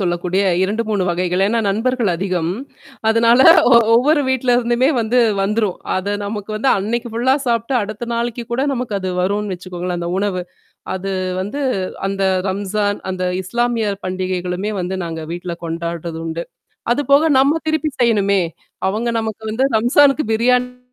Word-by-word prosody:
சொல்லக்கூடிய 180 +1 0 0.2
2 210 +4 0
3 205 -3 +1
வகைகள். 180 +1 0
ஏன்னா 230 +2 +1
நண்பர்கள் 225 +1 0
அதிகம். 180 -2 -1 0.6
அதனால 230 +3 +5 0.3
ஒ - - +8 0.2
ஒவ்வொரு 290 +5 +4
வீட்ல 255 -1 +2
இருந்துமே 240 +2 +2
வந்து 230 +2 +1 0.2
வந்துரும். 210 -1 0 0.2
அத 200 +2 -1
நமக்கு 205 0 -5
வந்து 260 +5 +1
அன்னக்கி 235 +4 -2
ஃபுல்லா 250 +3 +2
சாப்பிட்டு 235 +2 0
அடுத்த 215 +3 -6
நாளைக்கு 235 0 -2
கூட 245 - 0
நமக்கு 240 -4 -3
அது 185 -1 -3
வரும் 205 +2 -1
வச்சுக்கோங்களேன் 180 0 -5
அந்த 170 0 -3
உணவு. 195 -3 -1 0.5
அது 195 +1 -4 0.3
வந்து 205 +10 -4 0.5
அந்த 195 0 -2 0.3
ரம்ஜான், 205 +1 -1
அந்த 185 0 -4 0.2
இஸ்லாமியர் 230 -1 -1
பண்டிகைகளுமே 185 +1 -2
வந்து 180 +1 -3
நாங்க 165 -1 -5
வீட்ல 175 0 -5
கொண்டாடுறது 170 0 -4
உண்டு. 165 +1 -3 0.5
அதுபோக 280 +3 +3
நம்ம 275 +3 +4
திருப்பி 315 0 0
செய்யணுமே. 200 -5 +3 0.5
அவுங்க 220 +5 -1
நமக்கு 220 0 -5
வந்து 260 +5 +2
ரம்ஸானுக்கு 275 +5 +4
பிரியாணி 250 +2 +1
210 Hz, 145 wpm, -18 LUFS, 185-240 Hz, 0.6 s, ஒ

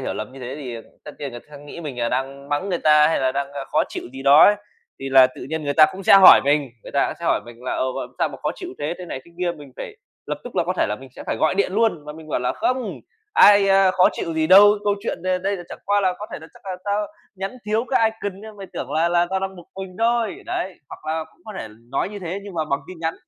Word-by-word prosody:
hiểu - - -3
lầm 110 +3 -6
như 135 - -11
thế 125 +1 -6
thì, 130 -5 -6
à, - - -8 0.2
tất 150 - -7
nhiên 140 -2 -5
người 120 -1 -9
ta - - -28
khắc 145 -1 -11
nghĩ 145 +3 -10
mình 145 -6 -6
là 120 -1 0
đang 135 +2 -4
mắng 145 +7 -1
người 175 -3 -1
ta, 150 0 +5
hay 160 - +1
là 130 -1 +1
đang 140 +1 -1 0.3
khó - - +3
chịu - - -6
gì 135 0 -8
đó 140 +2 +8
ấy. 205 - +6 0.5
Thì 135 - -4
là 135 -1 +7
tự 130 - -10
nhiên 160 -1 -3
người 145 - -1
ta 155 - +8
cũng 190 - -8
sẽ 195 - +6
hỏi 195 -1 +10
mình 145 -1 +1
người - - -11
ta - - +2
cũng - - -4
sẽ - - -6
hỏi - - +2
mình 120 0 -12
là 125 - -3
"Ồ, 130 0 -2
làm - - -7
sao - - +2
mà - - -9
khó - - 0
chịu 365 - -8
thế?" 150 +3 -2
thế 180 - -7
này 130 - -6
thế 170 - -18
kia, 180 -1 0
mình 145 -3 -13
phải 425 - -8 0.3
lập - - -3
tức - - -9
là - - +2
có - - -1
thể - - +2
là - - -2
mình - - -13
sẽ - - -8
phải - - -1
gọi - - +1
điện 405 - 0
luôn 215 -7 +1
và 150 - -7
mình 160 0 -12
bảo 145 - -1
là 125 - 0
"Không, 255 0 -1 0.4
ai, 205 - +7
a, 195 -1 +5
khó 185 0 +4
chịu 165 - -4
gì 160 0 +1
đâu. 205 +4 +7
Câu 205 -1 +2
chuyện - - -3
đây 185 0 0
đây 195 +2 -1
là 175 - -8
chẳng - - -9
qua 205 +1 +2
là 185 -2 +1
có 210 - -6
thể - - -5
là 160 - -11
chắc - - -19
là 185 -1 -4
tao 205 0 0 0.3
nhắn 195 +5 -5
thiếu 220 +2 0
cái 225 -4 +3
icon 205 -3 -6
nên 215 0 -11
mày 195 -1 -8
tưởng 135 - -5
là 160 +2 +2
là 175 0 +2
tao 190 0 0
đang 190 0 -4
bực 175 - -11 0.2
mình 185 -1 -10
thôi." 230 -1 0
Đấy. 185 0 -3
Hoặc 155 - -6
là 160 0 -3
cũng - - -30
có 215 - -8
thể - - -6 0.2
nói 140 - -1
như 205 0 -8
thế 185 0 -4
nhưng 200 -2 -10
mà 160 -2 -1
bằng 140 -2 -1
tin 185 - -9
nhắn. 165 0 -1
170 Hz, 310 wpm, -22 LUFS, 140-200 Hz, 0.5 s, hỏi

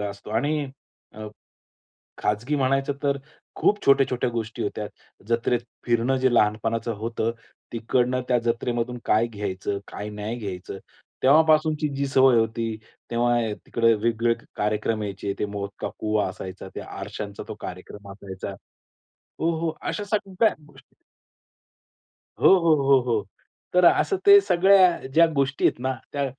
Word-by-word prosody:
असतो 100 0 -6
आणि 145 +6 0 0.5
अ, 110 0 -7 0.9
खाजगी 115 +8 -1
म्हणायचं 135 +1 +1
तर 140 -1 +1 0.4
खूप 205 0 +1
छोट्या-छोट्या 135 -2 +3
गोष्टी 115 -1 -4
होत्या. 105 +1 -3 0.4
जत्रेत 120 +1 +1 0.3
फिरणं 120 +3 +2
जे 130 -1 +2
लहानपणाचं 115 +2 +1
होतं, 115 +1 -2 0.4
तिकडनं 125 +2 0
त्या 125 - +3
जत्रेमधून 120 +1 -1
काय 110 +2 +3
घ्यायचं, 100 -2 -4
काय 105 +1 -6
नाही 105 +3 -5
घ्यायचं 95 -3 -6 0.4
तेव्हापासूनची 155 +1 +4
जी 140 0 0
सवय 130 -2 +5
होती, 115 0 -1 0.3
तेव्हा, 120 +1 +2
अ, 105 - -2
तिकडे 115 -1 +3
वेगवेगळे 115 +2 +1 0.2
कार्यक्रम 105 +1 -1
यायचे, 100 0 -4
ते - - 0
मौत 100 0 -3
का - - -2
कुवा 105 -2 0
असायचा, 95 0 -8
त्या - - -7
आरशचा 100 -1 -6
तो - - -5
कार्यक्रम 100 -1 -9
असायचा. 95 -2 -8 0.9
हो, 165 - +1
हो, 165 -1 -2
अशा 205 - -3
सगळ्या 205 0 +1
गोष्टी. 135 -2 -21 1.4
हो, - - +6
हो, 165 -2 +4
हो, 135 -1 +5
हो. 110 -5 0 0.5
तर 180 0 +5
असं 390 - +4
ते 400 0 +9
सगळ्या 185 - +4
ज्या 165 +1 +7
गोष्टी 135 0 0
आहेत - - +1
ना, 130 +1 -1 0.2
त्या 140 -1 -1
120 Hz, 140 wpm, -24 LUFS, 105-140 Hz, 1.4 s, ते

